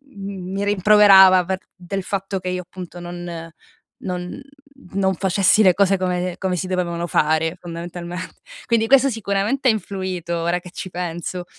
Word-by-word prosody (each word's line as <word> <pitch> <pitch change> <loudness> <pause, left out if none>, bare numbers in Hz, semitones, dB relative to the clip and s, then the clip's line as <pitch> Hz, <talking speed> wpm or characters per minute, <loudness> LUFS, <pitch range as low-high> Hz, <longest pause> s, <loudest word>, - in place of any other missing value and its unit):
mi 195 -1 -5
rimproverava 195 -2 +6
per 190 +2 -2 0.2
del 190 +1 -5
fatto 195 +1 -3
che 185 0 -4
io, 180 0 -2
appunto, 180 0 -10
non 175 -1 -7 0.5
non 180 +6 -5 0.5
non 190 -1 +2
facessi 195 +3 +3
le 185 -2 +6
cose 195 +1 +3
come 180 -1 -2
come 185 -2 -2
si 185 - -3
dovevano 175 -2 -2
fare, 160 +1 +1
fondamentalment 175 +1 -7 0.4
quindi 225 -1 +1
questo 275 +1 +5
sicuramente 225 +4 0
ha - - +7
influito, 185 -5 -4
ora 170 +1 0
che 180 0 -13
ci 185 - -6
penso. 175 0 -5
185 Hz, 150 wpm, -21 LUFS, 175-195 Hz, 0.5 s, ha